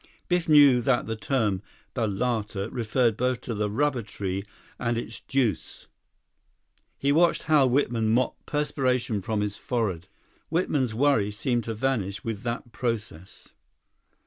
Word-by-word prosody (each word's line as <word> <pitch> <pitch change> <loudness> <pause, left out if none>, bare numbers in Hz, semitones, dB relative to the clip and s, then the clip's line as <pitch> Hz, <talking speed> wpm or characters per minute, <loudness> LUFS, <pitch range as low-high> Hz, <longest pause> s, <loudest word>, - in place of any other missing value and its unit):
Biff 180 -2 0
knew 145 -5 +7
that 125 0 +1
the 110 - -3
term 110 -5 0 0.3
balata 110 -2 -1
referred 115 0 +1
both 125 +1 0
to 115 - -4
the 105 -1 -1
rubber 130 +3 +1
tree 100 -2 -4 0.4
and 120 -1 0
its 115 -1 -5
juice. 120 - -2 1.1
He 140 - +1
watched 170 +3 +3
Hal 145 -4 +4
Whitman 120 -4 +1
mop 125 +3 +2
perspiration 130 -7 0
from 105 +2 -1
his 105 0 -2
forehead. 100 -8 -2 0.4
Whitman's 145 -9 0
worry 130 -5 +3
seemed 120 +2 -1
to 115 - -3
vanish 105 -5 -1
with 110 -3 -4
that 120 0 -4
process. 105 -8 -5
120 Hz, 135 wpm, -26 LUFS, 105-135 Hz, 1.1 s, knew